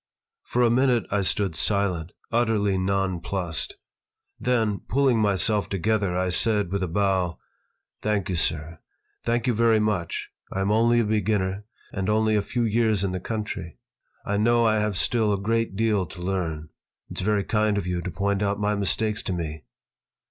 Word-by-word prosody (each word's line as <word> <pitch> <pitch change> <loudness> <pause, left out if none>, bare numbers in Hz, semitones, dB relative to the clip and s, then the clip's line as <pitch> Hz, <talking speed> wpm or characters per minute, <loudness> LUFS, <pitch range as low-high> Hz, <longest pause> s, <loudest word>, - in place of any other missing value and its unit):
For 125 - 0
a 115 - +4
minute 125 -3 +3
I 100 0 +2
stood 95 -2 0
silent, 90 -5 0 0.2
utterly 110 -4 +2
nonplussed. 95 -3 -1 0.6
Then, 115 -5 +1
pulling 130 -2 +3
myself 105 0 +1
together, 100 -1 0
I 90 0 0
said, 105 0 +2
with 100 0 -1
a 95 - 0
bow: 95 -1 0 0.6
"Thank 105 -3 0
you, 95 - -2
sir. 80 -1 -1 0.4
Thank 120 0 0
you 125 - +2
very 115 0 +3
much. 105 -6 -2 0.2
I 95 - -2
am 100 +2 +1
only 115 +2 +4
a - - 0
beginner, 105 -2 0 0.3
and 95 0 -2
only 110 0 +2
a 105 - +3
few 120 +4 -2
years 110 -2 +2
in 95 - 0
the 95 - -3
country. 105 -5 -5 0.5
I 105 - 0
know 120 +2 +3
I 110 -1 +3
have 105 -2 -1
still 110 0 +1
a 100 - -1
great 115 0 0
deal 105 -4 +1
to 90 - -11
learn. 85 -4 -3 0.4
It's - - -3
very 105 +1 +1
kind 105 -1 +1
of 100 - -2
you 90 -1 -2
to 90 - -4
point 100 +4 -1
out 100 0 0
my 105 0 +1
mistakes 105 +2 0
to 95 - -3
me. 80 -5 -5
100 Hz, 175 wpm, -25 LUFS, 95-110 Hz, 0.6 s, a